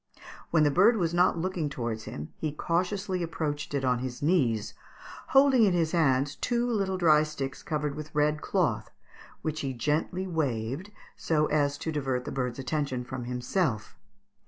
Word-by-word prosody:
When 160 -2 +4
the 145 - +4
bird 210 +9 +5
was 170 -4 0
not 175 0 +3
looking 175 -3 -2
towards 115 -5 -4
him 75 +1 -7
he 155 - -3
cautiously 180 +4 -1
approached 150 -3 -3
it 135 -1 0
on 125 -1 +2
his 125 -1 -5
knees, 130 - +1 0.5
holding 270 -2 +5
in 195 -4 +4
his 165 -2 +1
hands 145 -3 +2
two 240 -1 0
little 195 -5 0
dry 155 -4 +5
sticks 145 -3 -4
covered 150 -2 -2
with 155 +1 -7
red 150 +1 +2
cloth, - - 0 0.5
which 155 -1 -2
he 135 -2 -2
gently 150 +9 -1
waved 140 - -2 0.3
so 155 -2 +1
as 145 -1 +1
to 160 - -3
divert 135 -4 -2
the - - -4
bird's 125 -3 -2
attention 135 -2 -2
from 125 0 -6
himself. 125 - -1
150 Hz, 165 wpm, -28 LUFS, 130-175 Hz, 0.5 s, bird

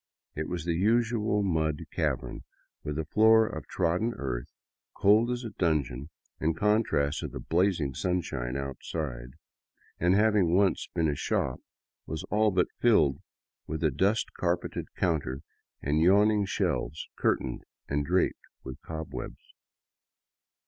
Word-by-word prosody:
It 75 +1 -3
was 85 -2 -4
the 85 - +1
usual 110 +2 +2
mud 80 -5 0
cavern, 65 -4 -2 0.4
with 75 0 -4
a 80 - -2
floor 110 +6 +5
of 80 -9 -6
trodden 90 +7 0
earth, - - -4 0.4
cold 110 +4 +4
as 125 0 -2
a 115 - -5
dungeon 75 -7 -1 0.3
in 80 +1 0
contrast 85 -8 +1
to - - -3
the - - -7
blazing 85 -5 +1
sunshine 70 -8 -2
outside, 70 -2 -5 0.6
and, 90 +2 +3
having 105 -5 +3
once 95 -2 +2
been 85 -2 +2
a 75 - +1
shop, 65 -2 -1 0.5
was 80 +2 -4
all 110 +1 +4
but 90 -2 +1
filled 80 - +4 0.5
with 80 +1 -4
a 80 - +3
dust 100 - +1
carpeted 85 -1 -2
counter 70 -6 -1 0.4
and 75 +3 +1
yawning 105 +4 +4
shelves 90 - -2
curtained 65 -2 0 0.3
and 70 +1 0
draped 90 +5 0 0.2
with 65 - -8
cobwebs. 80 -1 -7
85 Hz, 135 wpm, -28 LUFS, 75-105 Hz, 0.6 s, floor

